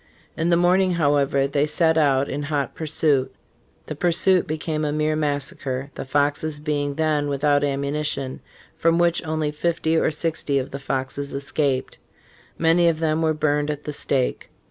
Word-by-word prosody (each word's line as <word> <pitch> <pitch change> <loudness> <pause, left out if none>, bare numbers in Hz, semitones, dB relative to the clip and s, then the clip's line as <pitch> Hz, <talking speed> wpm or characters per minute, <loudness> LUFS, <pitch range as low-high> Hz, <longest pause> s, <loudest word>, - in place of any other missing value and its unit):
In 165 +1 0
the 170 - +4
morning, 180 +1 +3
however, 145 -4 +2
they 140 +1 0
set 160 +1 +2
out 140 -3 +3
in 145 - -3
hot 145 -1 -2
pursuit." 150 -4 0 0.5
The - - -5
pursuit 180 +3 +2
became 155 0 -2
a 150 - 0
mere 155 +1 0
massacre 140 -2 -2
(the - - -6
Foxes 145 +2 0
being 145 -2 -2
then 155 -2 +1
without 145 +1 +1
ammunition), 140 -1 -2 0.4
from 165 0 +2
which 175 0 +2
only 155 -2 -1
fifty 160 +1 0
or - - +3
sixty 155 -2 -1
of 130 -1 -3
the 140 - -5
Foxes 135 +1 -3
escaped. 140 -1 -1 0.6
Many 170 +1 +3
of 165 -2 +1
them 160 0 0
were 160 -1 +1
burned 150 -1 0
at 150 0 -4
the 150 - -5
stake. 135 -3 -1
150 Hz, 165 wpm, -23 LUFS, 140-160 Hz, 0.6 s, the